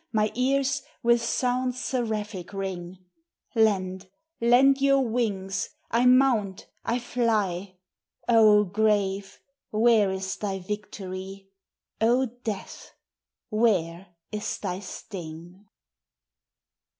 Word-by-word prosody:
my 215 Hz, -1 st, +1 dB
ears 270 Hz, +2 st, +1 dB, 0.2 s
With 235 Hz, 0 st, +4 dB
sounds 250 Hz, +1 st, 0 dB
seraphic 215 Hz, -7 st, -3 dB
ring: 185 Hz, -2 st, -5 dB, 0.5 s
Lend, 190 Hz, -5 st, +1 dB, 0.3 s
lend 265 Hz, +4 st, +5 dB
your 275 Hz, -2 st, +4 dB
wings! 195 Hz, -5 st, -1 dB, 0.2 s
I 240 Hz, +2 st, +3 dB
mount! 250 Hz, -7 st, +3 dB, 0.2 s
I 235 Hz, -, 0 dB
fly! 210 Hz, -7 st, -1 dB, 0.5 s
O 215 Hz, -3 st, +6 dB
Grave! 200 Hz, -1 st, 0 dB, 0.3 s
where 220 Hz, -2 st, +4 dB
is 190 Hz, 0 st, -3 dB
thy 195 Hz, -2 st, -3 dB
victory? 195 Hz, -1 st, -7 dB, 0.5 s
O 245 Hz, +4 st, +4 dB
Death! 230 Hz, -4 st, -7 dB, 0.6 s
where 185 Hz, -5 st, 0 dB, 0.2 s
is 210 Hz, -1 st, -3 dB
thy 185 Hz, -2 st, -4 dB
sting? 180 Hz, -1 st, -9 dB
210 Hz, 90 wpm, -26 LUFS, 190-240 Hz, 0.6 s, O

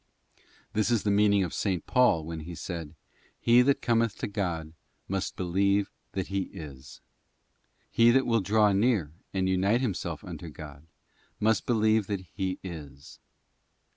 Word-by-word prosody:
This 110 Hz, +2 st, +1 dB
is 115 Hz, -4 st, +2 dB
the 105 Hz, -, +1 dB
meaning 100 Hz, -1 st, +4 dB
of 90 Hz, -, -3 dB
S. 95 Hz, -4 st, -1 dB
Paul 125 Hz, -11 st, +3 dB
when 80 Hz, 0 st, -5 dB
he 85 Hz, +2 st, -8 dB
said, 85 Hz, -3 st, -6 dB, 0.4 s
'He 120 Hz, +1 st, +5 dB
that 140 Hz, +2 st, +2 dB
cometh 115 Hz, -2 st, +1 dB
to -, -, -3 dB
God 85 Hz, -6 st, -3 dB, 0.3 s
must 95 Hz, -1 st, -2 dB
believe 100 Hz, +3 st, +1 dB, 0.2 s
that 95 Hz, -2 st, -3 dB
He 95 Hz, -1 st, -1 dB
is.'* 70 Hz, -3 st, -10 dB, 0.9 s
He 115 Hz, 0 st, +5 dB
that 130 Hz, +2 st, +4 dB
will 115 Hz, -2 st, +2 dB
draw 105 Hz, +2 st, +3 dB
near 100 Hz, -, +2 dB, 0.2 s
and 95 Hz, -1 st, 0 dB
unite 95 Hz, +6 st, +2 dB
himself 110 Hz, -9 st, -3 dB
unto 85 Hz, -, -7 dB
God, 75 Hz, 0 st, -11 dB, 0.5 s
must 110 Hz, -1 st, +1 dB
believe 110 Hz, -3 st, +2 dB
that 100 Hz, -2 st, -2 dB
He 95 Hz, -2 st, -2 dB
' -, -, -44 dB
is. 75 Hz, -6 st, -9 dB
95 Hz, 155 wpm, -28 LUFS, 85-110 Hz, 0.9 s, He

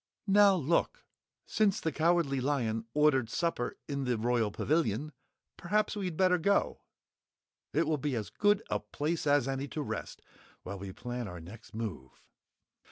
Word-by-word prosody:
"Now, 200 Hz, -1 st, +6 dB
look! 170 Hz, -, 0 dB, 0.4 s
Since 210 Hz, -3 st, +2 dB
the 160 Hz, -, -1 dB
Cowardly 160 Hz, -5 st, +2 dB
Lion 120 Hz, -5 st, 0 dB
ordered 145 Hz, -6 st, +3 dB
supper 165 Hz, -4 st, -1 dB
in 140 Hz, -2 st, -2 dB
the 125 Hz, -2 st, +1 dB
Royal 115 Hz, -1 st, +1 dB
Pavilion, 145 Hz, +2 st, 0 dB, 0.5 s
perhaps 210 Hz, +5 st, 0 dB
we'd 185 Hz, -6 st, -3 dB
better 185 Hz, -1 st, +4 dB
go. 200 Hz, +5 st, +1 dB, 0.9 s
It -, -, +2 dB
will 155 Hz, -2 st, 0 dB
be 140 Hz, -1 st, -1 dB
as 110 Hz, -3 st, -4 dB
good 205 Hz, 0 st, +2 dB
a -, -, +1 dB
place 155 Hz, +1 st, -3 dB
as 145 Hz, -3 st, +3 dB
any 135 Hz, +1 st, -2 dB
to 150 Hz, +1 st, -4 dB
rest -, -, -6 dB, 0.4 s
while 100 Hz, +1 st, -6 dB
we 95 Hz, 0 st, -6 dB
plan 120 Hz, +3 st, -5 dB
our 90 Hz, -2 st, -7 dB
next 100 Hz, +7 st, -12 dB
move." 90 Hz, -, -6 dB
145 Hz, 155 wpm, -31 LUFS, 115-170 Hz, 0.9 s, Now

